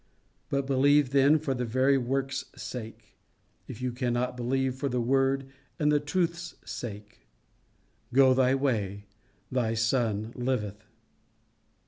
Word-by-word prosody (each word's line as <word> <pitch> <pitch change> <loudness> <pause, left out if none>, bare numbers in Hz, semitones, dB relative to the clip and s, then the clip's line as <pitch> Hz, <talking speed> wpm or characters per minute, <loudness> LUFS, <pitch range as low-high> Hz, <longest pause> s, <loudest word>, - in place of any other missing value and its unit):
But 140 -1 0
believe 140 +1 +3
then 140 +2 +5
for 150 -3 -2
the 125 -1 -2
very 130 +4 +2
work's 135 +1 -1
sake, 115 -3 -8 0.5
if 125 - -8
you 125 - 0
cannot 125 0 -1
believe 130 +2 0
for 135 +2 -3
the 125 0 -1
word 135 +2 +2 0.3
and 150 0 +2
the 150 - +4
truth's 170 +3 -2
sake. 105 - -8 0.8
Go 130 0 +6
thy 130 0 +3
way, 105 -7 -1 0.5
thy 120 -3 0
son 115 -2 0
liveth." 110 -4 -3
130 Hz, 125 wpm, -28 LUFS, 120-135 Hz, 0.8 s, Go